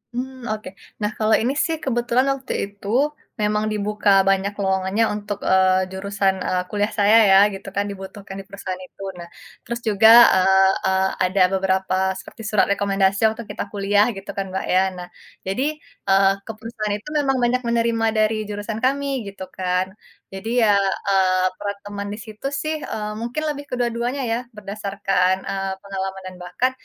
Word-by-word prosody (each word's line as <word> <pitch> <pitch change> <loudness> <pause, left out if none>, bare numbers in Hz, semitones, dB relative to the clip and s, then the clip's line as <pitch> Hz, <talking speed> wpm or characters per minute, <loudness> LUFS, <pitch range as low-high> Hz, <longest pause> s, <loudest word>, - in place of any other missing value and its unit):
Mmm, 260 0 -5
oke. 215 -2 -4 0.3
Nah 210 0 0
kalau 215 0 +1
ini 245 +4 +1
sih 325 - -1
kebetulan 245 0 +1
waktu 260 -1 -6
itu 200 0 -13 0.5
memang 210 0 +1
dibuka 210 0 0 0.2
banyak 195 +1 +1
lowongannya 190 +2 +1
untuk, 205 -1 -4
eee, 185 0 +4
jurusan, 195 0 0
eee, 180 0 +1
kuliah 205 +1 0
saya 205 +2 +6
ya 195 - +8 0.2
gitu 195 +1 -9
kan 200 +1 +1
dibutuhkan 195 0 -9
di - - -7
perusahaan 195 -2 -6
itu. - - -18 0.2
Nah, 175 - -8 0.4
terus 235 0 -4
juga, 215 +1 +5 0.3
eee 190 +1 +5
eee, 190 0 +2 0.2
ada 185 +1 +1
beberapa 190 0 0 0.2
seperti - - -12
surat 210 - +3
rekomendasi 195 -1 +1
waktu 225 +2 -7
kita - - -3
kuliah 205 0 +3
gitu 195 - -10
kan, 195 - -1
Mbak, 190 - -3
ya. 185 - +5 0.2
Nah 180 0 -7 0.4
jadi, 195 +8 0 0.5
eee, 195 0 +5
ke - - -5
perusahaan 220 -2 -4
itu 210 - -19
memang 270 -2 +1
banyak 250 +1 +2
menerima 230 -1 +1
dari 215 0 +3
jurusan 205 +1 -4
kami, 280 +1 +1 0.2
gitu 195 -1 -8
kan. 185 +1 -1 0.4
Jadi 195 +4 -6
ya, 210 -2 +5 0.3
eee, 185 -1 +3
per - - -6 0.2
teman 200 0 -5
di - - -6
situ 215 +4 -7
sih, 310 +2 -2 0.2
eee, 210 -1 -3
mungkin 240 +6 -3
lebih 290 -1 -4
kedua-duanya 245 +2 -1
ya, 230 - +1 0.2
berdasarkan, 195 -2 0
eee, 195 0 -2
pengalaman 190 -1 -5
dan 185 - -9
bahkan 180 +9 0
205 Hz, 170 wpm, -22 LUFS, 190-225 Hz, 0.5 s, ya